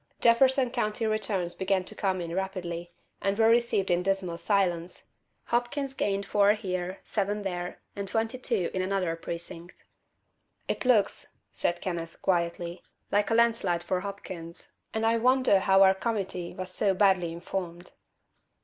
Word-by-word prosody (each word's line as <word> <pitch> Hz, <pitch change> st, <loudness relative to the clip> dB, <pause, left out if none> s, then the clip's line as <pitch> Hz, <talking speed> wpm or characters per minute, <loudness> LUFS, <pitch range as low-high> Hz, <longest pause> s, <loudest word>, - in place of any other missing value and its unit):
Jefferson 255 Hz, +2 st, +4 dB
County 225 Hz, -2 st, -1 dB
returns 200 Hz, -5 st, -1 dB
began 190 Hz, 0 st, 0 dB
to 200 Hz, -, -9 dB
come 190 Hz, -3 st, -1 dB
in 170 Hz, -1 st, -5 dB
rapidly, 175 Hz, -2 st, -4 dB, 0.3 s
and 195 Hz, 0 st, 0 dB
were 225 Hz, 0 st, +5 dB
received 230 Hz, -5 st, +2 dB
in 175 Hz, 0 st, +3 dB
dismal 190 Hz, -2 st, -1 dB
silence. 180 Hz, -4 st, 0 dB, 0.4 s
Hopkins 250 Hz, +3 st, -1 dB
gained 200 Hz, -5 st, -1 dB
four 205 Hz, 0 st, +4 dB
here, 185 Hz, -3 st, -4 dB
seven 205 Hz, 0 st, -1 dB
there, 180 Hz, -2 st, -4 dB, 0.2 s
and 200 Hz, -1 st, -4 dB
twenty 225 Hz, +5 st, -1 dB
two 225 Hz, -8 st, 0 dB
in 185 Hz, -, 0 dB
another 185 Hz, -3 st, 0 dB
precinct. 170 Hz, +1 st, -8 dB, 0.8 s
"It -, -, -2 dB
looks," 225 Hz, -6 st, +2 dB, 0.3 s
said 175 Hz, -, -1 dB
Kenneth, 170 Hz, -3 st, -4 dB
quietly, 170 Hz, -1 st, -1 dB, 0.3 s
"like 205 Hz, 0 st, +2 dB
a 225 Hz, -, +2 dB
landslide 225 Hz, -7 st, +2 dB
for 185 Hz, +1 st, 0 dB
Hopkins, 185 Hz, -4 st, -8 dB, 0.2 s
and 220 Hz, 0 st, -1 dB
I 230 Hz, +1 st, +3 dB
wonder 255 Hz, -4 st, +4 dB
how 190 Hz, 0 st, +5 dB
our 190 Hz, 0 st, +7 dB
Committee 190 Hz, -4 st, -3 dB
was 185 Hz, 0 st, -5 dB
so 195 Hz, +1 st, +1 dB
badly 185 Hz, -4 st, +3 dB
informed." 175 Hz, 0 st, -5 dB
195 Hz, 150 wpm, -28 LUFS, 175-215 Hz, 0.8 s, our